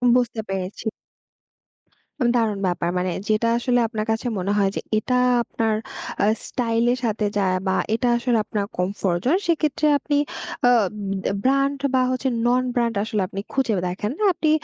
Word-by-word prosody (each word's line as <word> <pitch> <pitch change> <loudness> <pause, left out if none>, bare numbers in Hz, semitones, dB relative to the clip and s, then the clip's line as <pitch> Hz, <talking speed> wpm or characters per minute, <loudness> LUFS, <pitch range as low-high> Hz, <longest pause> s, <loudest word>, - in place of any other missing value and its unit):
বুঝতে 245 -2 +1
পেরেছি। 195 +3 -4 1.3
অ - - +4
দারুণ 220 -4 +1
ব্যাপার! 175 -1 -1
মানে 180 0 0 0.2
যেটা 215 +2 +2
আসলে 245 0 +1
আপনার 215 -1 -3
কাছে 225 +3 -1
মনে 190 +2 -1
হয়, 200 -1 +3
যে - - -2 0.2
এটা 250 +4 0 0.3
আপনার 225 -1 -1 0.5
আ - - +5 0.2
স্টাইল 230 -2 0
এর - - -2
সাথে 215 -1 0
যায়। 185 -2 +2
বা 190 - +2 0.2
এটা 245 +2 +1
আসলে 240 -1 +1
আপনার 205 -1 -2
কমফোর্ট 180 -1 0
জোন 315 +9 +4
সেক্ষেত্রে 305 -2 +1
আপনি 290 0 0 0.5
আব 230 -6 +4 0.3
বে - - 0
ব্র্যান্ড, 275 +1 +2 0.2
বা 260 - +4
হচ্ছে 255 +1 0 0.2
নন-ব্র্যান্ড 245 -1 +1
আসলে 215 -1 -1
আপনি 195 0 -6
খুঁজে 265 -5 +1
দেখেন 205 +4 -3
না। - - 0
আপনি 315 -2 0
230 Hz, 165 wpm, -23 LUFS, 200-255 Hz, 1.3 s, আ